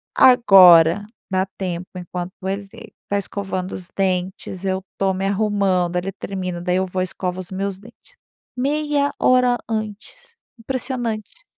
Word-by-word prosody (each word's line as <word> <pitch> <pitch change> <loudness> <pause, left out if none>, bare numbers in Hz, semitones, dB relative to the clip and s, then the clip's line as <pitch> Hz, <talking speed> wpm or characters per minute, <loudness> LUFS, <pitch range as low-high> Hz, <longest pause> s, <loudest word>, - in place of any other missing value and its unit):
Agora 195 -7 +7 0.3
dá 190 0 +1
tempo 180 -1 -4
enquanto 180 0 -6
ele 195 +1 -2
está 205 -1 -7
escovando 190 -2 -4
os 180 -2 -6
dentes, 185 0 -2
eu 190 0 0
estou 195 -1 0
me 190 +1 -2
arrumando. 195 -4 +1
Ele 185 +2 -2
termina, 185 -2 -5
daí 180 0 0
eu 190 - +1
vou 185 0 -3
e - - +1
escovo 180 0 -4
os 185 0 -7
meus 195 0 -3
dentes. 235 - -18 0.4
Meia 285 +1 0
hora 250 -1 +4
antes. 220 - -6 0.2
Impressionante. 245 - -4
195 Hz, 140 wpm, -21 LUFS, 185-230 Hz, 0.4 s, Agora